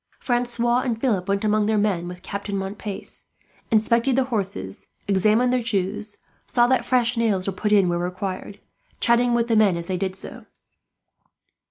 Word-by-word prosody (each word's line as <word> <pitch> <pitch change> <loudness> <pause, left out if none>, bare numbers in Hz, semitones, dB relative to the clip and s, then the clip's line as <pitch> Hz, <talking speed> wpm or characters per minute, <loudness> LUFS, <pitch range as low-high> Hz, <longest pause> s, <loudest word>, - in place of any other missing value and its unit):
Francois 240 -1 +1
and 240 -4 -2
Philip 210 -8 0
went 200 +1 0
among 210 0 +2
their 220 0 +2
men 195 -5 0
with 180 0 -9
Captain 200 0 -4
Montpace, 195 +1 -5 0.4
inspected 235 +3 +2
the 265 - +3
horses, 190 - -4 0.2
examined 215 +6 +3
their 250 - +2
shoes, 205 -1 -2 0.3
saw 240 -1 +3
that 260 +1 +2
fresh 245 -1 +1
nails 210 -5 +1
were 195 - -2
put 210 +3 -2
in 200 -3 +5
where 175 0 0
required, 185 +2 -4 0.4
chatting 235 0 +3
with 235 0 +1
the 230 - +2
men 205 -5 +4
as 170 - -5
they 185 +1 -2
did 190 0 -2
so. 190 - -6
210 Hz, 170 wpm, -23 LUFS, 190-235 Hz, 0.4 s, in